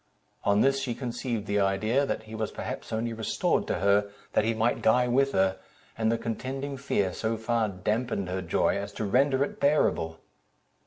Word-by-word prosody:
On 100 +1 +4
this 135 0 +3
she 125 -3 -2
conceived 120 -3 -3
the 105 0 0
idea, 110 +8 +2
that - - -2
he 110 0 -11
was 110 -1 -2
perhaps - - -6
only 115 +1 -1
restored 110 -1 0
to - - 0
her, 100 +2 +2 0.2
that - - +3
he 115 +1 0
might 115 +2 +1
die 125 +3 +4
with 135 +3 +2
her; 95 0 +2 0.4
and 110 0 +1
the 115 - +1
contending 130 +5 -4
fear 100 -8 0
so 110 0 -1
far 110 -1 0
damped 105 +6 -1
her 95 -4 -2
joy, 85 -2 +1
as - - -4
to 110 - -3
render 135 +5 +3
it - - -5
bearable. 85 - +2
110 Hz, 190 wpm, -28 LUFS, 100-125 Hz, 0.4 s, On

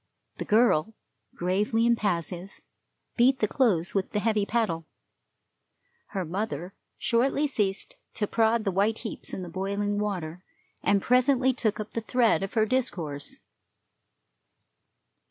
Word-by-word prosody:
The - - -4
girl, 220 -3 +3 0.4
gravely 205 +6 +1
impassive, 195 -5 -1 0.6
beat 255 +2 +5
the 215 - +1
clothes 200 - +1
with 195 -2 -1
the 210 - +1
heavy 210 -2 +1
paddle. 170 -9 -1 1.2
Her 190 -4 -3
mother 180 -1 -4 0.2
shortly 270 +5 +2
ceased 205 -9 -1 0.2
to 215 - 0
prod 225 +1 +2
the 195 - 0
white 205 +4 +1
heaps 225 - -3
in 185 - -5
the - - -7
boiling 200 +3 -2
water, 180 -4 -3 0.4
and 200 -1 +2
presently 255 +1 +3
took 220 -4 -1
up 215 0 -5
the 230 - -3
thread 230 -1 +2
of 195 +3 -5
her 220 -1 +4
discourse. 175 - -2
210 Hz, 130 wpm, -27 LUFS, 185-230 Hz, 1.2 s, beat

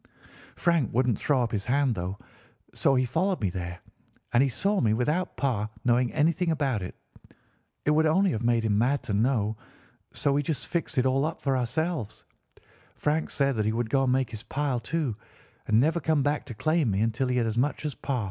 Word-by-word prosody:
Frank 170 -7 +1
wouldn't 125 -3 +1
throw 135 -4 +2
up 115 - -2
his 100 -4 -2
hand, 135 0 +2
though; 95 0 -4 0.6
so 135 - +2
he 130 0 +2
followed 180 +10 0
me 100 -4 -1
there, 90 -1 -5 0.5
and 120 - +5
he 135 - +3
saw 200 - 0
me 110 -2 +2
without 150 +10 -1
Pa 115 -6 0 0.2
knowing 120 0 +3
anything 165 +3 +1
about 140 -9 0
it. 90 - -6 0.9
It 150 - +3
would 155 +1 +4
only 185 +4 +3
have 110 - -2
made 120 -1 +2
him 105 -2 +2
mad 135 +5 +1
to 105 - -3
know, 110 -1 +1 0.5
so 140 - 0
we 145 - +2
just 145 -2 -3
fixed 170 -4 -3
it 130 - +3
all 135 +1 +2
up 160 +2 -2
for 135 -2 0
ourselves. 130 - -2 0.7
Frank 155 +2 0
said 140 -2 +1
that 110 - +1
he 110 - +2
would 115 -1 -2
go 135 -1 +3
and 125 - +2
make 130 -2 +1
his 110 -2 -6
pile, 135 0 -2
too, 140 -1 -2 0.5
and 110 +1 +4
never 160 +6 +2
come 155 -3 +1
back 145 +1 0
to 120 - -7
claim 155 +1 +1
me 100 0 0
until 115 +4 0
he 125 0 0
had 120 - +2
as 115 +1 -1
much 145 +4 -1
as 150 - -2
Pa. 135 -1 -3
130 Hz, 215 wpm, -27 LUFS, 115-150 Hz, 0.9 s, and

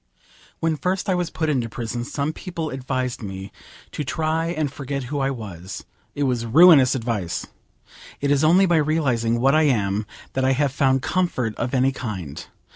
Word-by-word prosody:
When 160 -1 0
first 180 +5 -1
I - - +3
was 180 -2 -1
put 160 - -2
into 130 -6 0
prison 120 +2 -4
some 145 +4 -2
people 165 -4 -5
advised 130 -1 -3
me 95 -1 -7 0.4
to 150 - -3
try 160 +3 -1
and 155 -5 -2
forget 140 -1 -4
who 145 - 0
I 135 0 +1
was. 100 -8 -7 0.3
It 145 - -1
was 125 -3 0
ruinous 140 +1 +7
advice. 115 -9 -2 0.7
It 140 0 0
is 145 +1 +3
only 175 +5 +5
by 175 -3 +3
realising 130 -7 +1
what 135 +3 +4
I 155 - +5
am 105 -3 0 0.3
that 130 - 0
I 130 0 +3
have 140 0 +1
found 135 -1 +2
comfort 150 -12 0
of 125 - -2
any 130 +1 +3
kind. 95 - -6
135 Hz, 180 wpm, -23 LUFS, 115-155 Hz, 0.7 s, ruinous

